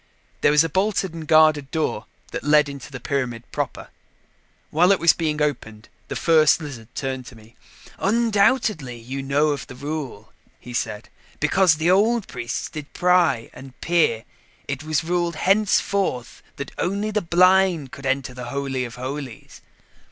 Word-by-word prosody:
There - - +5
was 150 +1 +5
a - - 0
bolted 190 +1 0
and 160 -2 -8
guarded 155 -3 +4
door 160 +1 -2 0.2
that - - -5
led 150 0 +4
into 140 -2 -9
the 130 - -7
pyramid 125 -3 -3
proper. - - -4 0.8
While 175 +5 +4
it 195 - +3
was 170 - +5
being 155 -2 -2
opened, 110 -7 -4 0.2
the - - -5
First 155 -2 +4
Lizard 135 -8 -8
turned 130 -2 -4
to 125 - -12
me. 110 +1 -18 0.4
"Undoubtedly 210 - +1
you 130 +4 -6
know 140 +3 +1
of 145 -3 -3
the 125 - -10
rule," 140 -6 -6 0.3
he 125 - -10
said. 110 -2 -3 0.3
"Because 170 +2 +3
the 160 +3 +1
old 220 +3 +2
priests 120 -2 -4
did 150 -3 -9
pry 180 -10 +2
and 130 0 -13
peer, 165 -10 +1 0.4
it 140 +1 -4
was 155 0 -1
ruled 170 0 -1
henceforth 195 - 0
that 140 -1 -6
only 200 +4 -1
the 210 0 0
blind 180 -4 +3
could 135 -1 -7
enter 135 -1 -1
the 125 0 -7
Holy 135 -2 -3
of 120 - -9
Holies." 130 -1 -7
150 Hz, 160 wpm, -22 LUFS, 130-175 Hz, 0.8 s, There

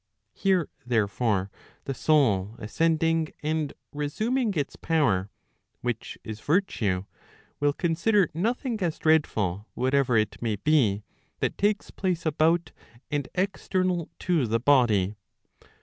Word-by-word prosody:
Here, 190 -5 +1 0.2
therefore, 105 -4 0 0.3
the 135 - -3
soul 115 -10 +2
ascending 165 +7 +1 0.2
and 155 -1 -1 0.2
resuming 215 - 0
its 145 -3 -2
power, 110 - +1 0.5
which 120 -2 -3
is 110 -1 -6
virtue, 110 - 0 0.5
will 145 0 +3
consider 185 +4 +2
nothing 230 - -1
as 170 -3 0
dreadful 110 - +1
whatever 130 -1 +2
it 110 -1 0
may 115 -3 0
be, 110 -5 +2 0.4
that - - -2
lakes 205 0 +1
place 180 -4 -2
about 160 +2 +2 0.4
and 145 -3 -1
external 185 -2 0
to 165 -9 +1
the 115 +1 +1
body. 110 -7 +3
145 Hz, 115 wpm, -27 LUFS, 110-170 Hz, 0.5 s, will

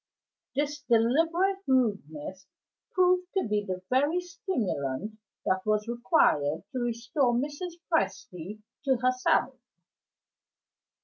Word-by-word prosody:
This 295 +1 -1
deliberate 330 - +3
rudeness 190 - 0 0.4
proved 365 -1 +3
to 380 - +1
be 210 0 +1
the 185 -2 -4
very 290 +7 +3
stimulant 215 - -3 0.3
that 190 -1 +2
was 215 0 +1
required 230 - +2
to 255 - -3
restore 240 +2 0
Mrs. 295 +7 -3
Presty 195 - -2 0.2
to 265 -2 +3
herself. 255 +1 +2
240 Hz, 100 wpm, -28 LUFS, 205-300 Hz, 0.4 s, deliberate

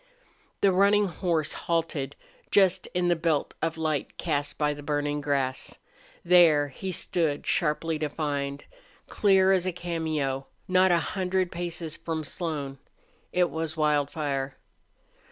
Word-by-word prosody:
The 200 - +5
running 200 +2 +4
horse 170 -4 -1
halted 160 -5 -2 0.3
just 190 -2 +4
in 180 0 +2
the 175 - +3
belt 160 -3 0
of 165 0 -1
light 155 -3 -2
cast 145 -3 -2
by 150 -1 +1
the 145 - -9
burning 145 0 -1
grass. 135 -2 -2 0.5
There 165 -5 +6
he 190 +8 -5
stood 160 -4 0
sharply 160 0 0
defined, 145 -2 -3 0.4
clear 190 -2 +4
as 185 -1 +2
a - - +1
cameo, 160 -6 -2 0.2
not 185 0 +4
a 175 - +5
hundred 185 +1 -1
paces 170 -2 -4
from 165 -1 -3
Slone. 145 -4 -4 0.5
It 180 -1 +2
was 160 0 -3
Wildfire. 145 -2 0
160 Hz, 130 wpm, -27 LUFS, 145-175 Hz, 0.5 s, There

